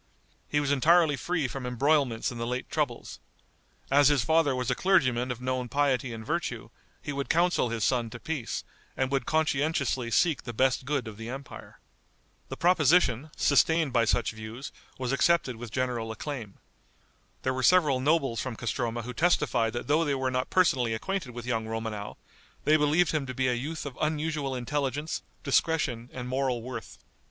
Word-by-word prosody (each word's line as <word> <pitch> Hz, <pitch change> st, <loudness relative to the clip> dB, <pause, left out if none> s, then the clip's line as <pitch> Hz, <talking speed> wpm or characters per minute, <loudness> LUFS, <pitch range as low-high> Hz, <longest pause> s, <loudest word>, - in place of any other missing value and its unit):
He 145 Hz, -, +2 dB
was 145 Hz, -1 st, 0 dB
entirely 155 Hz, +2 st, +4 dB
free 160 Hz, -1 st, -1 dB
from 135 Hz, +1 st, -6 dB
embroilments 125 Hz, -1 st, +1 dB
in 120 Hz, -, -7 dB
the 115 Hz, -, -2 dB
late 125 Hz, +1 st, -4 dB
troubles. 145 Hz, -7 st, -2 dB, 0.7 s
As 140 Hz, 0 st, +6 dB
his 145 Hz, -5 st, +3 dB
father 160 Hz, -2 st, +3 dB
was 125 Hz, 0 st, -1 dB
a -, -, +3 dB
clergyman 130 Hz, -8 st, +2 dB
of 125 Hz, -2 st, -3 dB
known 130 Hz, -1 st, -2 dB
piety 135 Hz, -3 st, +1 dB
and 110 Hz, -1 st, -7 dB
virtue, 145 Hz, -8 st, -3 dB, 0.3 s
he 145 Hz, -, -4 dB
would 140 Hz, 0 st, -3 dB
counsel 170 Hz, -6 st, +2 dB
his 115 Hz, -2 st, -2 dB
son 120 Hz, -1 st, +1 dB
to 120 Hz, -, -9 dB
peace, 150 Hz, -6 st, -4 dB, 0.3 s
and 130 Hz, 0 st, 0 dB
would 135 Hz, -1 st, 0 dB
conscientiously 145 Hz, -5 st, 0 dB
seek 160 Hz, +5 st, +2 dB
the 120 Hz, -, -7 dB
best 130 Hz, +1 st, +2 dB
good 140 Hz, -4 st, -1 dB
of 105 Hz, -2 st, -8 dB
the 115 Hz, +1 st, -7 dB
empire. 135 Hz, +2 st, -9 dB, 0.7 s
The -, -, -6 dB
proposition, 155 Hz, -5 st, +3 dB
sustained 155 Hz, 0 st, +3 dB
by 115 Hz, -1 st, +3 dB
such 120 Hz, +1 st, +1 dB
views, 110 Hz, +4 st, -8 dB, 0.3 s
was 130 Hz, -1 st, -2 dB
accepted 135 Hz, -3 st, +2 dB
with 115 Hz, -1 st, -8 dB
general 120 Hz, -2 st, -2 dB
acclaim. 115 Hz, -4 st, -6 dB, 0.9 s
There 130 Hz, -, +1 dB
were 130 Hz, -, -2 dB
several 150 Hz, -4 st, +4 dB
nobles 135 Hz, -5 st, +1 dB
from 130 Hz, -3 st, -4 dB
Castroma 120 Hz, +1 st, -2 dB
who 125 Hz, +2 st, -6 dB
testified 120 Hz, -8 st, +2 dB
that 120 Hz, -, -4 dB
though 150 Hz, +3 st, +3 dB
they 145 Hz, -3 st, 0 dB
were 130 Hz, -1 st, -1 dB
not 130 Hz, 0 st, -1 dB
personally 130 Hz, -11 st, +2 dB
acquainted 185 Hz, +4 st, -3 dB
with 120 Hz, -1 st, -8 dB
young 115 Hz, -3 st, -1 dB
Romanow, 110 Hz, -2 st, -5 dB, 0.5 s
they 155 Hz, -, +4 dB
believed 155 Hz, +3 st, +3 dB
him 150 Hz, -4 st, -1 dB
to 130 Hz, -, -5 dB
be 130 Hz, +1 st, +1 dB
a 125 Hz, -, +2 dB
youth 150 Hz, +7 st, -4 dB
of 140 Hz, -3 st, -7 dB
unusual 150 Hz, -3 st, -1 dB
intelligence, 140 Hz, +4 st, -2 dB, 0.2 s
discretion 140 Hz, -5 st, +1 dB
and 125 Hz, -1 st, -6 dB
moral 130 Hz, -2 st, -1 dB
worth. 115 Hz, -9 st, -7 dB
130 Hz, 180 wpm, -28 LUFS, 120-150 Hz, 0.9 s, As